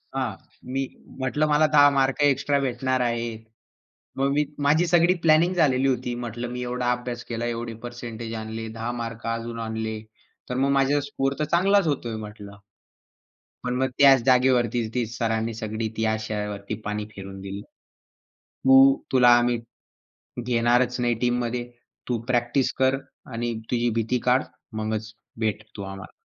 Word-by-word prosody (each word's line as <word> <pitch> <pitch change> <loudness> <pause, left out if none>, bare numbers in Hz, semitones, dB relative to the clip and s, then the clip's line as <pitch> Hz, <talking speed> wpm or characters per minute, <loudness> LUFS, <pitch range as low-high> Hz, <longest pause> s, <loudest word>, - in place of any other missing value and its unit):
हां. 130 -4 -1 0.4
मी 135 - 0 0.4
म्हटलं 140 +4 +1
मला 150 +1 +4
10 145 -1 +8
मार्क 135 -1 +1
एक्स्ट्रा 140 0 +2
भेटणार 130 0 0
आहेत. 115 -2 -1 0.8
मग 135 +1 +1
मी 150 +1 +2 0.2
माझी 160 +4 +4
सगळी 175 +1 +4
प्लॅनिंग 165 +3 +5
झालेली 135 -5 +3
होती. 125 -1 -1
म्हटलं, 120 +1 -5
"मी 125 - -4
एवढा 125 0 -1
अभ्यास 120 -1 -3
केला. 115 0 -2
एवढे 115 -1 -3
पर्सेंटेज 115 -1 -6
आणले. 110 +1 -5
10 115 +2 -2
मार्क 115 0 -6
अजून 115 0 -3
आणले. 110 0 -3 0.5
तर 125 - -2
मग 135 +2 +2
माझा 140 +2 +3
स्कोर 135 -1 -1
तर 150 - +1
चांगलाच 195 0 +4
होतोय 120 -6 -2
म्हटलं." 100 -1 -11 1.1
पण 125 0 -1
मग 130 - +1
त्याच 135 -3 +7
जागेवरती 125 -3 +3
ती 125 -2 0
सरांनी 115 -1 -1
सगळी 110 0 -3
ती 110 - +1
आशावरती 105 -2 -3
पाणी 105 0 -2
फिरवून 95 0 -8
दिलं. 100 +1 -6 0.8
तू, 135 +1 +5 0.2
तुला 125 -1 +6
आम्ही 120 0 +1 0.9
घेणारच 120 +1 +2
नाही 120 -1 +2
टीममध्ये. 120 0 0 0.4
तू 120 -2 0
प्रॅक्टिस 120 +1 +1
कर 130 +1 +3 0.4
आणि 120 +1 -2 0.2
तुझी 120 0 +2
भीती 115 +2 0
काढ. 125 +1 +4 0.3
मगच 110 0 -3 0.3
भेट 110 -1 -1
तू 100 - -6
आम्हाला. 95 0 -8
120 Hz, 150 wpm, -25 LUFS, 115-135 Hz, 1.1 s, 10